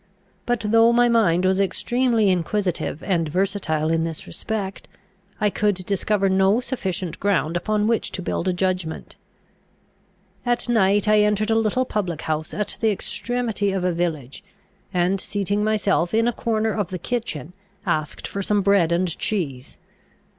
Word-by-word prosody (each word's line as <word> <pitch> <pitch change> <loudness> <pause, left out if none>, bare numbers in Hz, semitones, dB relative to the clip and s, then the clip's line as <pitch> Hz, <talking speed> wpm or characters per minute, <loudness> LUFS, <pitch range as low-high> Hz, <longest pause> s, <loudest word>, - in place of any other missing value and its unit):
But 240 -1 +1
though 225 +2 +5
my 240 +1 +4
mind 190 -7 +3
was 190 +1 +3
extremely 230 +3 +1
inquisitive 180 -3 -1
and 170 -5 0
versatile 170 -3 0
in 165 0 +1
this 165 -1 -5
respect, 200 -3 -4 0.5
I 210 -1 +2
could 205 0 +1
discover 195 +2 0
no 190 +3 +3
sufficient 190 -9 -4
ground 175 -5 +1
upon 210 +4 0
which 230 0 0
to 185 - -4
build 175 - -2
a - - +3
judgment. 180 -3 -2 1.3
At 240 0 0
night 205 -3 +3
I 215 0 +5
entered 210 +1 +2
a - - +3
little 225 +3 +1
public 180 - -2
house 155 0 -2
at 210 - -3
the 225 - +2
extremity 225 0 -1
of 190 -1 -2
a 180 - +2
village, 160 -6 -3 0.5
and, 185 +1 +1
seating 205 +1 -1
myself 210 -3 +1
in 230 +1 +3
a 240 - +1
corner 220 -1 0
of 205 -4 -1
the 185 - -5
kitchen, 180 - -4 0.3
asked 155 -2 -2
for 200 - -4
some 205 0 +1
bread 195 -4 +3
and 175 -1 +1
cheese. 140 -12 -3
195 Hz, 155 wpm, -23 LUFS, 175-215 Hz, 1.3 s, though